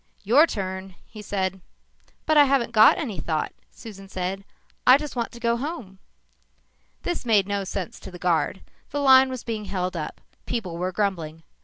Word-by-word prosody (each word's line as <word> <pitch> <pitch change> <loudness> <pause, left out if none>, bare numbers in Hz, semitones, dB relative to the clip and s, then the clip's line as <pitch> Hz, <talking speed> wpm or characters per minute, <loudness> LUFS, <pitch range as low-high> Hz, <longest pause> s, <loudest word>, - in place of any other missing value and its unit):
"Your 265 +11 +5
turn," 190 - -5
he 215 - -11
said. 190 -2 -2 0.6
"But 310 - +2
I 295 -1 +8
haven't 265 -4 +1
got 220 -1 +7
any 220 - -4
thought," 155 0 -2 0.2
Susan 195 -3 -12
said. 190 +1 -3 0.4
"I 255 +2 +9
just 295 -1 -7
want 235 -2 -2
to 235 - -10
go 235 0 +1
home." 240 - -6 1.0
This 350 - -2
made 210 -5 +3
no 200 -1 -1
sense 190 -1 -5
to - - -10
the 180 - -10
guard. 180 +1 0 0.3
The 290 - -3
line 265 -1 +6
was 255 -2 -6
being 220 -3 -4
held 185 -2 -3
up. 155 -2 -5 0.3
People 195 -8 -3
were 180 +2 -2
grumbling. 170 -5 -2
200 Hz, 175 wpm, -24 LUFS, 185-245 Hz, 1.0 s, I